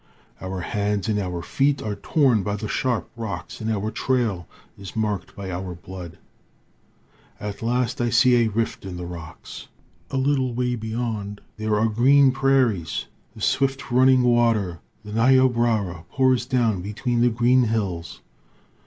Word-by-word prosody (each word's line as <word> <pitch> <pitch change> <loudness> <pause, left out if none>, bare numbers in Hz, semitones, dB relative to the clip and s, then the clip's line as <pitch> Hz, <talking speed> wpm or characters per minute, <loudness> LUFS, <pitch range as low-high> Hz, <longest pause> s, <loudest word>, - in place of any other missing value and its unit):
Our 95 0 -4
hands 100 +1 -1
and 105 -1 +1
our 90 -3 -3
feet 140 +1 +1
are 105 - -2
torn 125 +1 +2
by 100 +1 -2
the 105 +1 -5
sharp 125 +2 -1
rocks, 115 -2 -6
and 110 - -2
our 105 0 -2
trail 110 -8 -1 0.3
is 100 -1 -10
marked 105 -3 -2
by 95 -2 -6
our 90 0 -5
blood. 90 -1 -9 1.2
At 105 -1 -6
last 120 +1 0
I 120 - +1
see 125 +1 +5
a 115 -1 +3
rift 110 +1 -2
in 95 -2 -6
the 90 - -5
rocks. 85 -2 -9 0.4
A 135 - -2
little 130 -2 +1
way 125 0 0
beyond 110 -3 -4 0.2
there 110 -1 0
are 110 - +3
green 130 +5 +5
prairies. 130 - +1 0.3
The - - -11
swift 135 -1 0
running 130 +1 +5
water, 115 -8 +2 0.3
the 105 - -7
Niobrara, 115 -7 +2
pours 130 -2 +2
down 115 -8 +1
between 115 +5 -2
the 120 - +5
green 120 +2 +3
hills. 100 -7 -3
110 Hz, 155 wpm, -23 LUFS, 100-125 Hz, 1.2 s, see